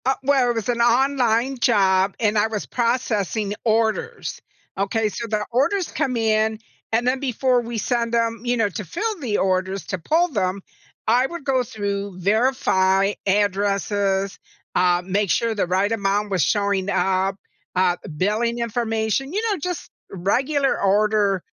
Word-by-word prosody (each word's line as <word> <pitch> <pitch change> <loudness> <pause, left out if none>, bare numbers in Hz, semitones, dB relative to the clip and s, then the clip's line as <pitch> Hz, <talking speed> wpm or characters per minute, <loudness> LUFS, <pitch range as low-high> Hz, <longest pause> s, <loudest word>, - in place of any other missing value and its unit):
Uh, 265 +1 +3
well, 265 -2 +3
it 240 - 0
was 225 0 -3
an 240 -1 +1
online 250 0 +2
job 195 -4 +3
and 215 -1 +1
I 210 - +3
was 215 -2 -4
processing 220 -4 -1
orders, 220 -1 -1 0.3
okay? 210 +3 0
So, 230 +3 -5
the 210 -1 -1
orders 320 - +1
come 255 -3 -1
in, 220 -1 +1 0.3
and 230 +2 +1
then 260 +1 +1
before 255 -1 +1
we 235 0 -5
send 235 +1 -1
them, 230 -1 0
you 245 0 0
know, 225 -2 +2
to 210 +2 -5
fill 420 - -3
the 235 -8 -1
orders 190 0 0
to 185 - -3
pull 330 - +2
them, 195 - -1 0.5
I 245 +4 +4
would 345 -1 -8
go 270 -2 +1
through, 200 -3 -4
verify 195 -2 +2
addresses, 200 0 0 0.4
uh, 180 0 +3
make 195 +1 0
sure 230 +4 +1
the 200 -4 -1
right 190 +4 +1
amount 205 -1 0
was 185 -6 +2
showing 200 +3 0
up, 190 0 +1 0.4
uh, 180 -1 +2 0.2
billing 220 +6 0
information 230 - -1
you 415 - 0
know, 395 - -1
just 360 +3 -5 0.2
regular 265 - 0
order, 205 -1 +2
220 Hz, 155 wpm, -22 LUFS, 195-245 Hz, 0.5 s, I